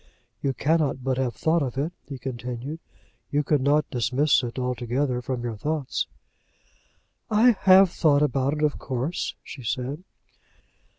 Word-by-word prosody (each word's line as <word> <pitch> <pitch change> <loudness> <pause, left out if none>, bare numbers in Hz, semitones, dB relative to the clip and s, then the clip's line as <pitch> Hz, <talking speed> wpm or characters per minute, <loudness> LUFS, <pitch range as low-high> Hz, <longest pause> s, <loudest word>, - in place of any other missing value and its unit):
"You 135 - 0
cannot 150 -4 +1
but 130 -1 0
have 125 -3 -1
thought 165 +1 +2
of 130 -2 -3
it," 155 +6 -1
he 140 - -6
continued. 125 +4 -5 0.5
"You 145 0 +1
could 145 -1 +2
not 145 +3 +3
dismiss 130 +4 +2
it 120 -1 -5
altogether 125 +1 -1
from 125 -1 -3
your 115 -3 -4
thoughts." 150 +2 -2 1.2
"I 225 +3 +6
have 190 -3 +6
thought 150 -4 +3
about 135 -1 +1
it, 155 0 -2
of 150 -1 +1
course," 130 +6 -3
she 135 - -9
said. 130 +7 -3
140 Hz, 145 wpm, -25 LUFS, 125-150 Hz, 1.2 s, I